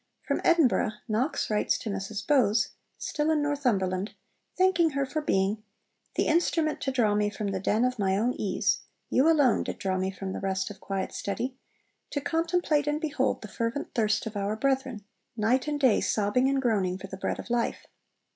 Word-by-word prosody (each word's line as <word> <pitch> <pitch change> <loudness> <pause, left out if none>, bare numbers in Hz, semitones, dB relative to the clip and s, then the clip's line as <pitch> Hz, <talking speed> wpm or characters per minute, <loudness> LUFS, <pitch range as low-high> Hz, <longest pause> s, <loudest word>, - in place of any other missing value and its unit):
From - - -1
Edinburgh 310 -10 +3
Knox 225 +3 0
writes 210 - +2
to 220 - -5
Mrs 195 +1 -4
Bowes 225 -7 +3 0.3
(still 300 +1 -1
in 305 -2 +2
Northumberland), 210 -10 0 0.4
thanking 365 -3 +4
her 275 0 0
for 305 +4 -3
being 200 -4 +1 0.5
'the - - +2
instrument 320 -1 +1
to 270 - -1
draw 230 -5 +2
me 210 0 +2
from 205 0 -4
the 195 -1 -2
den 215 +5 +2
of 250 -2 -1
my 190 -1 +2
own 240 +4 +1
ease 195 -3 0 0.3
(you 275 +5 +4
alone 290 -7 +4
did - - -5
draw 190 -1 -1
me 190 +1 0
from 190 0 -5
the - - -4
rest 190 +1 -2
of 200 - -11
quiet 195 -1 -3
study) 245 +6 -3 0.5
to 285 - -2
contemplate 325 -1 +1
and 295 +1 +1
behold 285 -7 -1
the - - -6
fervent 230 +7 -3
thirst 215 -3 +1
of 220 -1 -6
our 200 +1 -1
brethren, 260 -3 -1 0.3
night 245 +6 +2
and 295 -1 -1
day 260 -6 +4
sobbing 220 +5 +2
and 275 -1 0
groaning 195 -6 +1
for 190 - -9
the 190 - -7
bread - - -2
of - - -8
life. 240 -1 -1
230 Hz, 190 wpm, -28 LUFS, 200-285 Hz, 0.5 s, thanking